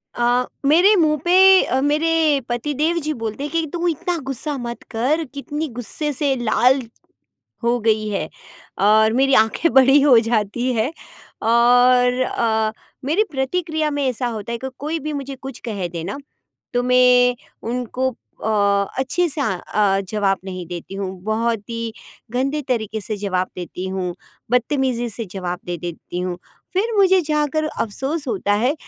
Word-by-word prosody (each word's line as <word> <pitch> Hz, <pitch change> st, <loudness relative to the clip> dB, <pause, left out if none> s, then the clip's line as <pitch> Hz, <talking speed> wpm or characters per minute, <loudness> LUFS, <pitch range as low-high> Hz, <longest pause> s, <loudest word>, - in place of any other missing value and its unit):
अ, 245 Hz, +1 st, +2 dB, 0.2 s
मेरे 350 Hz, +9 st, +6 dB
मुँह 310 Hz, -4 st, +3 dB
पे 375 Hz, +2 st, +7 dB
अ, 260 Hz, -, 0 dB
मेरे 305 Hz, 0 st, +2 dB
पति 240 Hz, +5 st, -2 dB
देव 315 Hz, +5 st, +1 dB
जी 305 Hz, +1 st, -2 dB
बोलते 225 Hz, +4 st, -4 dB
हैं 295 Hz, -, -4 dB
कि, 330 Hz, 0 st, 0 dB
"तू 345 Hz, 0 st, -1 dB
इतना 345 Hz, +2 st, -1 dB
गुस्सा 280 Hz, +2 st, -3 dB
मत 240 Hz, -1 st, -6 dB
कर 265 Hz, +8 st, +1 dB
कितनी 295 Hz, +2 st, -4 dB
गुस्से 295 Hz, +6 st, -2 dB
से 275 Hz, 0 st, +1 dB
लाल, 250 Hz, +2 st, +3 dB, 0.8 s
हो 240 Hz, +1 st, +2 dB
गई 215 Hz, -1 st, +1 dB
है।" 180 Hz, -6 st, -2 dB, 0.6 s
और 220 Hz, +1 st, +5 dB
मेरी 270 Hz, +2 st, +3 dB
आँखें 225 Hz, +9 st, 0 dB
बड़ी 270 Hz, +2 st, +6 dB
हो 275 Hz, -4 st, +6 dB
जाती 225 Hz, +2 st, 0 dB
है 230 Hz, +4 st, 0 dB, 0.5 s
और 245 Hz, +2 st, +4 dB
अ, 220 Hz, -3 st, 0 dB, 0.3 s
मेरी 325 Hz, +10 st, +2 dB
प्रतिक्रिया 310 Hz, +2 st, -1 dB
में 290 Hz, -1 st, -1 dB
ऐसा 250 Hz, 0 st, -1 dB
होता 225 Hz, -1 st, -5 dB
है 235 Hz, -, -2 dB
क 265 Hz, -, -2 dB
कोई 310 Hz, +3 st, -2 dB
भी 305 Hz, +1 st, -4 dB
मुझे 275 Hz, -1 st, -5 dB
कुछ 265 Hz, -1 st, -9 dB
कह 200 Hz, -6 st, -3 dB
दे 170 Hz, -1 st, -6 dB
ना, 200 Hz, +9 st, -4 dB, 0.6 s
तो 245 Hz, 0 st, +1 dB
मैं 250 Hz, 0 st, +5 dB, 0.3 s
उनको 250 Hz, +1 st, -1 dB
अ, 200 Hz, -4 st, 0 dB
अच्छे 350 Hz, +7 st, +1 dB
से 295 Hz, 0 st, -3 dB
अ 190 Hz, -9 st, 0 dB, 0.2 s
अ, 200 Hz, -2 st, +3 dB
जवाब 200 Hz, -2 st, +1 dB
नहीं 185 Hz, -2 st, -6 dB
देती 175 Hz, +2 st, -7 dB
हूँ, 195 Hz, -1 st, -3 dB
बहुत 225 Hz, +1 st, 0 dB
ही 230 Hz, -1 st, -4 dB, 0.4 s
गंदे 275 Hz, +5 st, -1 dB
तरीके 220 Hz, -4 st, -2 dB
से 210 Hz, +2 st, -4 dB
जवाब 185 Hz, -2 st, -1 dB
देती 180 Hz, +1 st, -6 dB
हूँ, 185 Hz, -2 st, -3 dB, 0.4 s
बदतमीजी 250 Hz, -1 st, +1 dB
से 225 Hz, +1 st, -4 dB
जवाब 180 Hz, -2 st, -4 dB
दे 175 Hz, 0 st, -3 dB
देती 175 Hz, +1 st, -6 dB
हूँ। 180 Hz, -1 st, -3 dB, 0.4 s
फिर 415 Hz, +5 st, 0 dB
मुझे 380 Hz, -1 st, +5 dB
जाकर 300 Hz, 0 st, 0 dB
अफ़सोस 275 Hz, +3 st, -3 dB
होता 205 Hz, -3 st, 0 dB
है 240 Hz, +7 st, +2 dB
245 Hz, 165 wpm, -20 LUFS, 215-295 Hz, 0.8 s, पे